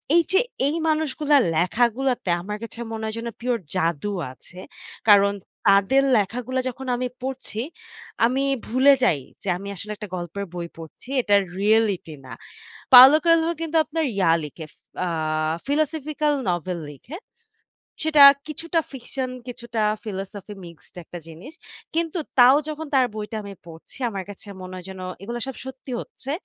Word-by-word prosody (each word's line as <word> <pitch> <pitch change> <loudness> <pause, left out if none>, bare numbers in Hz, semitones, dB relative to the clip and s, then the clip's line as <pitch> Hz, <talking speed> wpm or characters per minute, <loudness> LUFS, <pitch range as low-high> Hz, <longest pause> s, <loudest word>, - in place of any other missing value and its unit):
এই 340 - +7
যে 380 - +6 0.3
এই 305 - 0
মানুষগুলার 300 -2 +2 0.2
লেখাগুলোতে 240 +5 +1
আমার 210 +3 -5
কাছে 230 0 -9
মনে 220 0 -5
হয় 220 0 -4
যেন 235 - -5
pure 240 -3 -1
জাদু 170 +2 0 0.2
আছে। 180 +7 -15 0.5
কারণ 200 0 +6 0.3
তাদের 200 +8 +5
লেখাগুলা 245 +6 -1
যখন 265 +1 -8
আমি 250 0 -1 0.2
পড়ছি, 260 -4 -4 0.6
আমি 260 +3 +1 0.3
ভুলে 260 +4 +5
যাই 155 - +3 0.2
যে 195 - -3
আমি 200 +2 -8
আসলে 210 +4 -7
একটা 210 -2 -8
গল্পের 180 +3 -5
বই 170 -1 -4
পড়ছি, 165 - -12
এটা 205 -3 +3 0.2
reality 205 -6 +2
না। 120 - -9 0.6
Paulo 260 +4 +11
Coelho 330 0 +4
কিন্তু 325 0 -2
আপনার 320 +1 -2
ইয়া 180 -4 +3
লিখে, 155 +2 -8
ফ - - -32 0.3
আ - - -1 0.6
philosophical 300 0 0 0.2
novel 175 +1 -2
লিখে। 250 - -10 0.9
সেটা 305 -2 +5 0.3
কিছুটা 330 +2 -1
fiction 260 0 -5 0.2
কিছুটা 235 -2 -4 0.2
philosophy 200 0 -6
মিক্সড 170 -2 -15
একটা 175 - -9
জিনিস। 175 - -11 0.4
কিন্তু 335 +1 -1 0.2
তাও 250 +3 +8
যখন 310 +1 -5
তার 260 -2 +5
বইটা 215 +1 -5
আমি 200 - -7
পড়ছি 165 +7 -13
আমার 195 -2 -5
কাছে 205 +1 -12 0.2
মনে 185 0 -8
হয় 180 - -9
যেন 190 -1 -9 0.2
এগুলো 235 +4 -5
সব 265 - -6
সত্যি 265 0 -9
হচ্ছে। 270 - -10
235 Hz, 150 wpm, -23 LUFS, 195-275 Hz, 0.9 s, Paulo